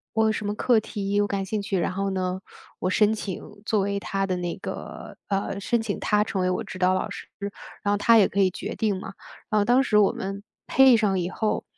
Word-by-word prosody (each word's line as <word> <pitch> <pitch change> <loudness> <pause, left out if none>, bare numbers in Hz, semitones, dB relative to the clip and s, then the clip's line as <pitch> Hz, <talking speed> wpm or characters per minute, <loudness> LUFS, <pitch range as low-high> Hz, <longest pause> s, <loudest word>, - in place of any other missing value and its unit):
我 220 - +3
有 220 - +3
什 210 -1 -4
么 205 - -1
课 235 +1 +3
题 205 -1 -1
我 205 - +2
感 200 -1 -2
兴 210 +2 -2
趣， 200 -1 -2
然 175 - 0
后 195 +1 -1
呢， 185 0 -2 0.4
我 185 - -1
申 210 +3 +3
请 205 -4 -4 0.2
作 215 - +2
为 200 +1 -1
他 195 0 -2
的 185 - -1
那 175 -1 -3
个 - - -7
呃， 195 0 -1
申 230 +2 0
请 - - -3
他 210 -1 +2
成 205 -3 -2
为 185 - +1
我 185 +5 -1
指 190 -2 -8
导 185 0 +3
老 185 - -2
师， - - -8 0.6
然 205 - +1
后 - - +3
他 230 +3 +5
也 205 - +6
可 200 - -5
以 190 - +5
决 - - -5
定 210 -4 0
嘛。 195 - -8 0.4
然 215 -2 +3
后 - - +2
当 245 +4 +4
时 215 -5 +3
我 200 - +5
们 195 +1 -5 0.3
配 265 -2 +7
上 200 -4 +1
以 175 0 -1
后， 215 +3 -1
200 Hz, 265 characters per minute, -25 LUFS, 190-215 Hz, 0.6 s, 配